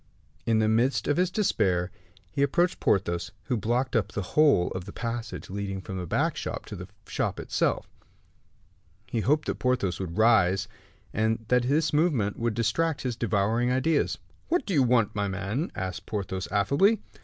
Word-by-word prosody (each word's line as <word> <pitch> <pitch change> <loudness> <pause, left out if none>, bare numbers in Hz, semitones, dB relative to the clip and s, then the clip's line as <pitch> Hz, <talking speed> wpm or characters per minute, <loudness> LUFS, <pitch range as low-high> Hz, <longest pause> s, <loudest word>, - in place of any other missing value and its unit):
In 115 -1 +3
the 110 0 +3
midst 115 +5 +2
of 145 - +2
his 180 0 +3
despair, 95 - +1 0.4
he 140 - -2
approached 170 +6 +2
Porthos, 85 -3 0
who 130 - -1
blocked 120 +5 0
up 110 -2 +1
the 105 - -3
whole 145 -13 +5
of 95 -1 -5
the 100 - -8
passage 115 +1 -5
leading 100 -1 -3
from 95 0 -6
the 90 - -5
back - - +1
shop - - -5
to - - -7
the - - -8 0.2
shop - - -2
itself. - - 0 1.2
He 115 - -2
hoped 150 +7 +2
that - - -3
Porthos 125 -8 0
would 90 -3 -5
rise 105 -3 +4 0.5
and 110 +1 0
that 125 0 +4
this 155 +3 +2
movement 145 - +1
would 115 -2 0
distract 160 +7 0
his 125 -3 -2
devouring 115 +2 +1
ideas. 140 +4 +1 0.3
"What 340 -5 +1
do 200 - -2
you 145 - +4
want, 120 -4 +3
my 100 0 -1
man?" 100 - -2
asked 95 -2 -5
Porthos, 95 -3 -3
affably. 140 - +3
115 Hz, 175 wpm, -27 LUFS, 100-135 Hz, 1.2 s, whole